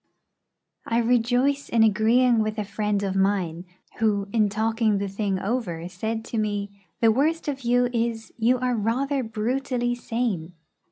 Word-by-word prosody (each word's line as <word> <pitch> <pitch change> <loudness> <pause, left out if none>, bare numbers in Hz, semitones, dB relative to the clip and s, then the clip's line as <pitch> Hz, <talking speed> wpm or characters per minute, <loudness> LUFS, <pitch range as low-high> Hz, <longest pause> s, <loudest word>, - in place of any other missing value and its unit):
I 230 - +1
rejoice 245 +4 +2
in 230 -1 +4
agreeing 225 +3 +4
with 215 0 -1
a 210 - -2
friend 210 0 -1
of 195 -1 -2
mine, 190 -3 0 0.3
who, 210 -3 +1
in 215 -3 +3
talking 220 0 +1
the 200 0 -2
thing 195 0 -2
over, 185 -6 -3
said 220 +5 -4
to 230 - -3
me, 205 -1 -2 0.3
'The 225 -1 +6
worst 310 +8 +1
of 275 -2 -3
you 245 0 +2
is, 230 -1 -2
you 240 +2 +2
are 250 0 0
rather 260 +6 0
brutally 245 +2 -1
sane.' 225 -8 -3
225 Hz, 155 wpm, -25 LUFS, 205-245 Hz, 0.3 s, The